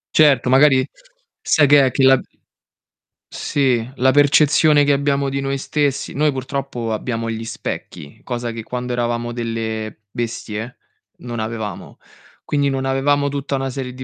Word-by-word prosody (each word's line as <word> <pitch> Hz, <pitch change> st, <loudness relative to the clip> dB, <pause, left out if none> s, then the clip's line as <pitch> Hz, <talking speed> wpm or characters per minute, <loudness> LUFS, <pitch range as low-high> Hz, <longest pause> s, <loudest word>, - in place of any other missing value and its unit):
Certo, 140 Hz, -5 st, +4 dB
magari 135 Hz, 0 st, +5 dB, 0.5 s
sai 150 Hz, -2 st, +3 dB
che 145 Hz, -1 st, +6 dB
è, 130 Hz, -, +1 dB
che 135 Hz, -, 0 dB
la 130 Hz, 0 st, +6 dB, 1.1 s
Sì, 125 Hz, -5 st, 0 dB
la 130 Hz, +1 st, +3 dB
percezione 145 Hz, +2 st, +4 dB
che 145 Hz, -, +2 dB
abbiamo 140 Hz, 0 st, +1 dB
di 140 Hz, +1 st, -2 dB
noi 135 Hz, 0 st, -2 dB
stessi. 140 Hz, -1 st, -1 dB
Noi 150 Hz, +1 st, +2 dB
purtroppo 130 Hz, -3 st, -4 dB
abbiamo 115 Hz, +1 st, -3 dB
gli 115 Hz, 0 st, -4 dB
specchi, 85 Hz, -8 st, -7 dB
cosa 120 Hz, -1 st, -4 dB
che 115 Hz, -1 st, -7 dB
quando 125 Hz, +1 st, -5 dB
eravamo 120 Hz, 0 st, -2 dB
delle 110 Hz, -2 st, -4 dB
bestie? 115 Hz, 0 st, -5 dB, 0.4 s
Non 120 Hz, -1 st, -7 dB
avevamo. 110 Hz, -3 st, -5 dB, 0.5 s
Quindi, 145 Hz, -1 st, 0 dB
non 135 Hz, 0 st, -2 dB
avevamo 140 Hz, +2 st, +1 dB
tutta 140 Hz, 0 st, -4 dB
una 135 Hz, 0 st, -1 dB
serie 130 Hz, -1 st, -5 dB
di 130 Hz, +1 st, -8 dB
130 Hz, 150 wpm, -19 LUFS, 115-140 Hz, 1.1 s, che